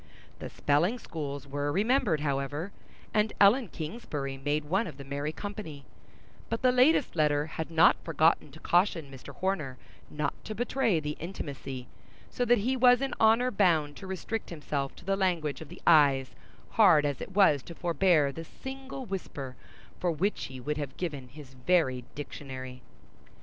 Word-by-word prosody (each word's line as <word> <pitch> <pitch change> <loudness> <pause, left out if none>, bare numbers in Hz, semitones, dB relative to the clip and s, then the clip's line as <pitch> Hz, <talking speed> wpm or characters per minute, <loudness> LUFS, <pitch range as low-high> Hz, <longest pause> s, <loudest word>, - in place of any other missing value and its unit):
The - - -6
spelling 165 +11 +1
schools 145 - -6
were 145 +1 -2
remembered, 205 - +2
however, 145 +5 -2 0.4
and 210 0 +2
Ellen 220 +4 +6
Kingsbury 150 - -5
made 145 +2 -1
one 190 +8 0
of 150 -5 -9
the 140 - -8
merry 140 +2 -3
company; 160 -5 -7 0.6
but 230 +2 -3
the 255 - +6
latest 255 - +4
letter 150 -2 +2
had 160 0 -5
not 165 +1 +4
forgotten 160 0 +2
to 160 - -12
caution 175 -5 +1
Mr. 135 -2 -10
Horner 165 -9 -2 0.3
not 150 -1 -2
to 215 - -5
betray 235 -5 +1
the 150 -1 -4
intimacy; 140 -7 -6 0.4
so 245 - -1
that 240 0 +5
he 245 +6 0
was 250 -1 +6
in 275 0 -2
honor 225 +3 +4
bound 160 -9 +2
to 190 - -9
restrict 190 +4 -4
himself 145 -4 -3
to 175 - -15
the 195 0 +1
language 175 -7 0
of 155 - -9
the - - -12
eyes 140 -5 +5 0.4
hard 180 -10 +6
as 145 -2 -2
it 190 - -8
was 170 -9 +5
to 170 - -11
forbear 170 -4 +2
the 165 +4 -7
single 265 - -8
whisper 145 - -6 0.4
for 180 - +1
which 185 +6 -1
he 130 -1 -8
would 150 +4 -3
have 145 -3 -5
given 145 -8 -4
his 135 0 -13
very 130 -2 +1
dictionary. 130 -3 -7
160 Hz, 165 wpm, -29 LUFS, 145-200 Hz, 0.6 s, Ellen